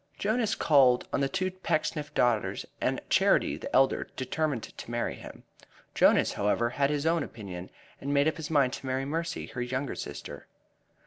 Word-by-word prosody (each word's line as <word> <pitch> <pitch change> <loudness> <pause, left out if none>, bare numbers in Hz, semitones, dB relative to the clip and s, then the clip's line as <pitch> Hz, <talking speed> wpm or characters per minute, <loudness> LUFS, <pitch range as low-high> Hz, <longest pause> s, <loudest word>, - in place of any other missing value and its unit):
Jonas 220 +1 0
called 130 -5 +4
on - - +1
the 135 - +1
two 185 +2 -1
Pecksniff 155 -4 -2
daughters, 120 -4 +1 0.2
and - - 0
Charity, - - +3
the - - -7
elder, 135 0 +3
determined 135 -1 -1
to - - -10
marry 120 0 -1
him. - - -11 0.5
Jonas, - - +4
however, 110 +4 +1
had 140 +2 +1
his 145 0 -1
own 165 0 +2
opinion, 95 -5 -7 0.3
and 140 - -4
made 140 +1 +3
up 160 - 0
his 160 -2 -5
mind 140 -5 +3
to 135 - -6
marry 130 +1 -1
Mercy, 165 +3 -3
her 125 - -6
younger 130 +2 -2
sister. - - -7
140 Hz, 175 wpm, -29 LUFS, 125-160 Hz, 0.5 s, called